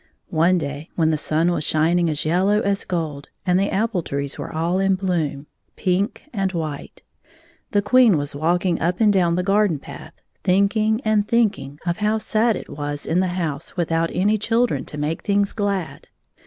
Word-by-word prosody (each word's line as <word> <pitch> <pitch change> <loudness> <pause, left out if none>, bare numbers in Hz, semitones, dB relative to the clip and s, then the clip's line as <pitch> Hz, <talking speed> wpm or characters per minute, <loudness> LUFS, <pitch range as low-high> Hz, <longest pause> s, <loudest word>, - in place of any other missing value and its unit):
One 170 +3 +3
day, 145 -1 -5
when 160 -2 +2
the - - +2
sun 155 +3 +1
was 165 -3 -1
shining 165 +3 +2
as 150 -1 -2
yellow 190 +6 +2
as 200 -1 -1
gold, 155 -5 -4 0.2
and 180 0 +3
the 195 - +1
apple 210 -2 0
trees 140 -2 -3
were - - -6
all 170 +3 0
in 195 0 +2
bloom,— 170 -7 -2 0.3
x - - -18
pink 190 +5 0
and 195 -3 0
white, 155 -4 -5 0.3
— 330 0 -33
the 205 -3 +2
Queen 235 -3 +5
was 145 0 -2
walking 170 +4 0
up 175 +2 0
and 215 -2 +4
down 175 -3 +2
the 180 - 0
garden 195 -3 +2
path, 140 - -11 0.3
thinking 215 +4 +2
and 215 -1 +2
thinking 210 -12 0
of 170 -1 -1
how 215 +1 +1
sad 220 +1 +1
it - - -7
was 145 0 -4
in 165 +3 +1
the 185 - +2
house 155 -1 -4
without 165 -1 0
any 210 +4 +1
children 230 +3 0
to 150 - -7
make 150 +2 -2
things 200 0 +1
glad. 200 -5 -3
180 Hz, 190 wpm, -22 LUFS, 160-205 Hz, 0.3 s, Queen